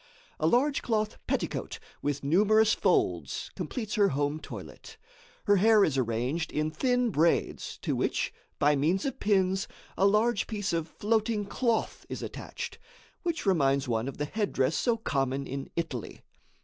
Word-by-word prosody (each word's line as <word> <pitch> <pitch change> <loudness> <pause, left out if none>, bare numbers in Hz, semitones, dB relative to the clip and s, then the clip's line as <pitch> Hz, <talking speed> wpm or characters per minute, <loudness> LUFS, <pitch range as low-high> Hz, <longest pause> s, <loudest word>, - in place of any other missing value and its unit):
A 155 - +2
large 270 - +3
cloth 215 -2 -1
petticoat - - -2 0.2
with 145 -1 -2
numerous 215 +8 +4
folds - - 0
completes 220 -5 -4
her 205 -2 +4
home 145 +2 -1
toilet. - - -10 0.5
Her 205 0 +4
hair 215 +1 +6
is 150 - +2
arranged 130 +6 -1
in 155 +1 -1
thin 250 - +1
braids, 165 -1 +1
to - - 0
which, - - -1 0.2
by 145 +1 +4
means 165 +8 +1
of 270 -1 -3
pins, 190 -2 +2 0.3
a 195 - +4
large 215 +2 +2
piece 205 -3 -2
of 165 -1 -1
floating 215 +2 0
cloth 230 +2 -1
is - - -5
attached, - - -6 0.4
which 340 -7 -2
reminds 140 -8 +2
one 115 0 0
of 135 - -6
the 150 - -1
headdress 160 -6 0
so 235 -2 +1
common 135 - -1
in 135 +1 -5
Italy. 155 -9 -4
190 Hz, 150 wpm, -29 LUFS, 145-220 Hz, 0.5 s, hair